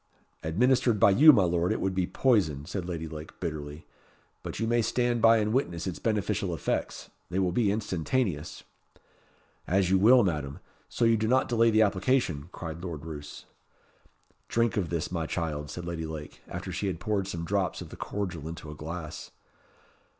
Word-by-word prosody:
"Administered 120 +6 +2
by 100 - +6
you, 150 +10 +9
my 105 -9 +4
Lord, 85 0 +1
it - - 0
would 95 - -1
be 90 -1 0
poison," 90 - +1
said 90 +1 -4
Lady 80 -2 -4
Lake, 80 0 -9
bitterly. 75 -3 -5 0.6
"But - - -6
you 115 - 0
may 120 +1 +2
stand 120 +1 0
by 115 0 +7
and 105 0 0
witness 85 -11 -1
its 95 -3 -4
beneficial 105 -4 -1
effects. - - -3 0.2
They 90 - -3
will 95 -2 +2
be 100 +1 +2
instantaneous." 95 - -2 1.0
"As 95 +1 +2
you 95 - +4
will, 120 +5 +7
Madam, 75 -6 -2 0.3
so 120 - 0
you 115 0 +4
do 110 0 0
not 130 +3 +3
delay 115 -1 +3
the 110 0 +5
application," 95 - 0
cried 85 -2 -7
Lord 80 -4 -6
Roos. 75 -3 -8 1.0
"Drink 115 -1 +1
of 95 -5 -1
this, 85 -1 -2
my 85 -3 -2
child," 75 -4 -3
said 90 - -6
Lady 85 -2 -4
Lake, 75 -1 -8
after 90 +2 -6
she 95 +4 -2
had 90 -4 -3
poured 100 +1 -1
some 85 -3 -4
drops 95 -1 -1
of - - -8
the - - -9
cordial 90 -7 -4
into 80 -2 -7
a - - -8
glass. 80 +1 -7
90 Hz, 180 wpm, -28 LUFS, 80-110 Hz, 1.0 s, you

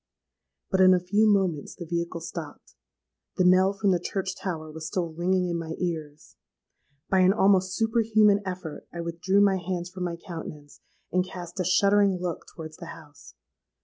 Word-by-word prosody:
"But 190 -1 +3
in 185 0 +7
a - - +2
few 205 +5 +2
moments 185 -7 0
the 175 - -8
vehicle 170 0 -3
stopped. 165 -2 -8 0.6
The 185 - +3
knell 185 +1 +5
from 200 -1 +1
the 180 - +2
church 190 +1 -3
tower 155 -5 -5
was 160 0 -7
still 170 -3 -3
ringing 180 +2 0
in 170 -1 -2
my 160 -1 -5
ears: 155 -4 -5 0.7
by 190 - +4
an 185 +1 +5
almost 190 -2 +3
superhuman 220 -2 +3
effort 180 -5 -6
I 170 - -5
withdrew 175 +4 +1
my 195 -2 +4
hands 175 0 -4
from 185 -1 -4
my 170 -1 -3
countenance, 160 -5 -9 0.3
and 185 0 +2
cast 180 0 -9
a - - +1
shuddering 195 +2 +3
look 175 -2 -4
towards 155 -1 -9
the 170 - -9
house. 150 -4 -13
180 Hz, 175 wpm, -26 LUFS, 170-190 Hz, 0.7 s, in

